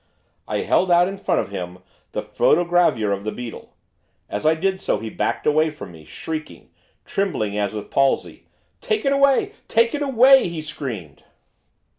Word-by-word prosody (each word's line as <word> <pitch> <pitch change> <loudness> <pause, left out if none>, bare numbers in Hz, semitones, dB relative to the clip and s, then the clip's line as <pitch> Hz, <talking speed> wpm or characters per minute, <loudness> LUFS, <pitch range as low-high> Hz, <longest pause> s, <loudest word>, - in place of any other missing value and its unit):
I - - -1
held 185 - +2
out 175 0 +5
in 195 +1 -6
front - - +1
of - - -7
him 90 -2 -6 0.4
the - - -2
photogravure 170 -12 +2
of 100 0 -4
the 110 - -3
beetle. 120 0 -9 0.5
As 105 +8 -2
I 160 - +4
did 190 +3 -1
so - - 0
he 110 0 -6
backed - - -2
away 155 +1 +3
from 150 - -10
me, 80 -2 -14
shrieking, 155 - -7 0.3
trembling 140 - -1
as 105 -1 -1
with 105 -1 -7
palsy. 135 -1 0 0.3
'Take 435 -8 -1
it 275 - +3
away! 280 +8 +3 0.2
take 230 0 +2
it 295 - -2
away!' 270 -4 +5
he 170 -1 -5
screamed. 120 - -7
160 Hz, 170 wpm, -22 LUFS, -, 0.5 s, out